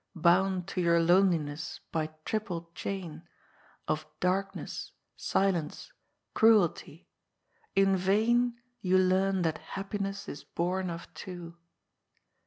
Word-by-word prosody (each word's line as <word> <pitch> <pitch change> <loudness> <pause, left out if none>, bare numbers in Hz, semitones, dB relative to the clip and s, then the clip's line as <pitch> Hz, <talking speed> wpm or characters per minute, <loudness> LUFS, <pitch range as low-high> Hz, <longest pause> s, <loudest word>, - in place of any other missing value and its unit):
Bound 180 +2 +3
to 185 - -1
your 170 -1 +4
loneliness 165 -4 +2
by 155 -1 0 0.2
triple 175 -6 -3
chain 175 -4 -5 0.6
Of - - -1
Darkness, 195 +2 -2 0.2
Silence, 180 -6 -1 0.4
Cruelty, 190 -7 +3 0.7
in 195 0 +4
vain 230 +6 +2 0.2
Tou 185 0 +3
learn 185 0 +3
that 160 -2 0
happiness 195 0 -4
is 145 - -7
bom 185 +2 -1
of 170 0 -7
two." 175 -3 -8
185 Hz, 100 wpm, -30 LUFS, 170-195 Hz, 0.7 s, your